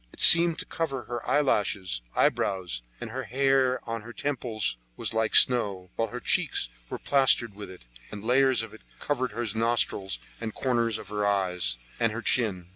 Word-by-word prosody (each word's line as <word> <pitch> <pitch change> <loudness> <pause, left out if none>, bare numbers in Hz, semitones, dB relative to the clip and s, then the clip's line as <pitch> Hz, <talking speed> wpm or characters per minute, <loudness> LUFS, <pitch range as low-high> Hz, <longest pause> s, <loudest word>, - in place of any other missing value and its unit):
It - - -16
seemed 170 0 +9
to 180 - -6
cover 135 -6 -4
her 120 +2 -6
eyelashes, 100 - 0
eyebrows, 90 -10 0 0.2
and - - -7
the - - -5
hair 135 0 0
on 115 -1 -4
her 120 +3 -11
temples 120 - -1 0.4
like 110 -1 0
snow, 100 -7 +4
while 115 - -1
her 125 +3 -7
cheeks - - 0 0.2
were - - -5
plastered 130 -5 +2
with 105 +1 -10
it, 90 -9 -14 0.2
and 105 -1 -9
layers 130 -1 +3
of 115 - -10
it 110 - -14 0.2
covered 130 -3 -2
her 120 - -3
nostrils, 110 -4 0 0.2
the 110 -1 -5
corners 115 -4 -1
of 100 - -11
her 105 0 -3
eyes, 90 -10 0 0.2
and 115 -2 +1
her 115 +1 -6
chin. 95 -8 0
115 Hz, 175 wpm, -26 LUFS, 100-130 Hz, 0.4 s, seemed